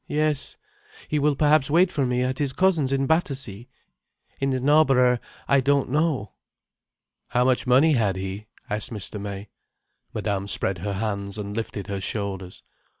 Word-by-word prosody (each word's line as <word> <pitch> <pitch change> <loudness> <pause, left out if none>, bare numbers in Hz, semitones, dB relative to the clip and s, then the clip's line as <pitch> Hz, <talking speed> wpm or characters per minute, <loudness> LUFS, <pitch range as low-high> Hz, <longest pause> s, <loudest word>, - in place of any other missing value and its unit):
"Yes. 150 -2 0 0.5
He 150 - +1
will 145 0 +2
perhaps 150 -1 +3
wait 175 +4 +4
for 140 -7 0
me 125 0 +1
at 130 +1 -2
his 140 -3 0
cousin's 170 -7 +2
in 135 0 +1
Battersea. 135 - -1 0.7
In 135 - 0
Knarborough, 130 -2 +4 0.3
I 140 - +4
don't 140 -1 +1
know." 150 - 0 1.0
"How 125 0 +1
much 130 0 +1
money 135 +6 +5
had 105 -7 +1
he?" 95 +3 -5 0.2
asked 105 0 -2
Mr. 105 -2 -5
May. 100 0 -6 0.6
Madame 100 -1 -2
spread 95 -2 -1
her 100 +3 -3
hands 100 0 -3
and 105 -1 -5
lifted 110 -3 -4
her 100 -1 -4
shoulders. 95 -3 -4
125 Hz, 150 wpm, -24 LUFS, 100-145 Hz, 1.0 s, money